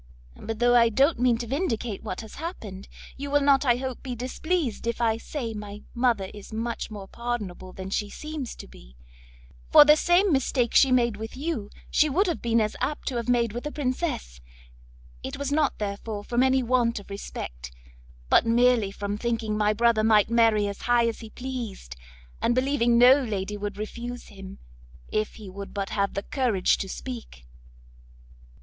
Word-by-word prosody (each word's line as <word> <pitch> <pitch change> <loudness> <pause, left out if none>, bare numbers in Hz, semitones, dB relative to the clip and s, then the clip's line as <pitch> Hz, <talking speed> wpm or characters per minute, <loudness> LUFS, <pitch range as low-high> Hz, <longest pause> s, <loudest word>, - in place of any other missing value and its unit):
But 225 0 -5
though 245 +1 +4
I 230 -1 +6
don't 270 +6 +3
mean 245 -2 +3
to 240 - -4
vindicate 240 - -2
what 185 - -5
has 220 -1 -11
happened, 210 - -7 0.3
you 285 +1 -5
will 290 +1 +3
not, 280 0 +4
I 240 -2 +4
hope, 260 0 -5
be 255 -2 -5
displeased 255 - -2
if 235 - -1
I 225 -2 +2
say 230 -1 -5
my 210 -1 -8
mother 235 -6 +1
is 205 -1 -11
much 230 +1 -3
more 205 -3 -8
pardonable 210 -7 -5
than 190 +1 -7
she 205 +1 -1
seems 300 0 -6
to - - -10
be, - - -16 0.8
for 295 - +10
the 300 +1 +7
same 350 +3 +3
mistake 260 -3 +1
she 270 - +6
made 235 -4 +2
with 220 +3 -7
you, 275 -8 -3 0.2
she 305 - +4
would 365 +9 +2
have 345 -4 -2
been 230 -1 +2
as 215 -1 0
apt 295 - -2
to 255 - -3
have 235 0 -3
made 235 -3 +2
with 240 +5 -4
a - - -5
princess; 255 - -3 0.8
it - - -6
was 280 0 -3
not, 295 -1 +1
therefore, 205 0 -4
from 240 +3 0
any 260 0 +3
want 240 -2 +1
of 200 - -14
respect, 60 - -7 0.6
but - - +5
merely 235 -2 +3
from 205 +1 -4
thinking 225 -2 -1
my 210 0 +2
brother 225 0 +3
might 215 0 +4
marry 225 -3 +4
as 200 - -6
high 240 -1 +4
as 230 - -3
he 225 - -9
pleased, 235 - -6 0.5
and 235 - +2
believing 255 -3 +2
no 255 +4 +7
lady 210 -3 -3
would 205 -1 -5
refuse 240 +3 -6
him, 195 -1 -10 0.5
if 215 0 -1
he 215 -3 -10
would 200 +2 -8
but 195 -1 -2
have 200 -1 0
the 200 - -2
courage 235 -9 +1
to 195 - -4
speak." 230 - -8
235 Hz, 185 wpm, -26 LUFS, 210-255 Hz, 0.8 s, for